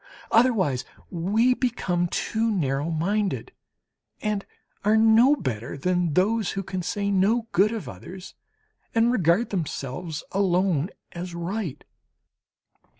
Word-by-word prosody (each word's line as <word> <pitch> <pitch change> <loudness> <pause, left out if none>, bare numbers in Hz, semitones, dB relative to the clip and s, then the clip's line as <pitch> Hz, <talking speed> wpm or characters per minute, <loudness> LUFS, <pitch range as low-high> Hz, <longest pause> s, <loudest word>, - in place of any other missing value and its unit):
Otherwise 200 - +3 0.3
we 210 +9 +2
become 190 -9 0
too 225 +6 -1
narrow 145 -6 0
minded 195 +5 -1 0.7
and 210 -2 -2 0.4
are 210 +2 +4
no 225 +5 +6
better 130 - -4
than 175 0 0
those 210 +2 +2
who 195 - -3
can 185 -1 -4
say 200 +3 -2
no 215 +5 +2
good 200 +4 +3
of 225 -3 -5
others 185 +1 -9 0.6
and 230 +1 +4
regard 190 0 +2
themselves 160 -2 -4
alone 185 -4 +1 0.2
as 175 0 -6
right. 170 - -4
190 Hz, 115 wpm, -25 LUFS, 170-220 Hz, 0.7 s, no